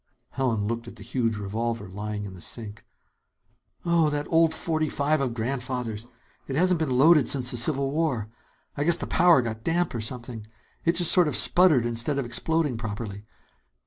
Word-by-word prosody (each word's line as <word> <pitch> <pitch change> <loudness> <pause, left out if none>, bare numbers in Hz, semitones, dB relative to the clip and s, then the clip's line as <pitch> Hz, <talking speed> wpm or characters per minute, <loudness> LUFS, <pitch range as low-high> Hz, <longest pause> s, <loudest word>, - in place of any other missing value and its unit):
Helen 120 -6 -1
looked 115 +2 -4
at 120 - -10
the 105 - -12
huge 115 -1 -1
revolver 110 +1 -3
lying 105 +2 -5
in 95 - -8
the 90 - -13
sink. 110 +4 -6 1.0
"Oh, 170 -2 +3
that 145 0 -2
old 165 -1 +4
forty 155 -1 -1
five 145 +1 0
of 125 -4 -2
Grandfather's! 125 -2 -4 0.4
It 135 - -4
hasn't 180 +2 +2
been 135 -6 -1
loaded 150 -2 +5
since 130 -3 +4
the 125 - +1
Civil 135 +3 +3
War. 140 -9 -1 0.5
I 145 - -1
guess 170 +2 +3
the - - -6
powder 175 -7 +4
got 110 -1 -5
damp 170 +3 0
or 115 - -3
something. 115 0 -6 0.4
It 170 - +3
just 175 -1 +3
sort 180 -3 +4
of 150 - -1
sputtered 165 -10 +4
instead 120 +5 -1
of 140 - -2
exploding 145 +2 0
properly. 105 -2 -6
125 Hz, 180 wpm, -25 LUFS, 115-155 Hz, 1.0 s, loaded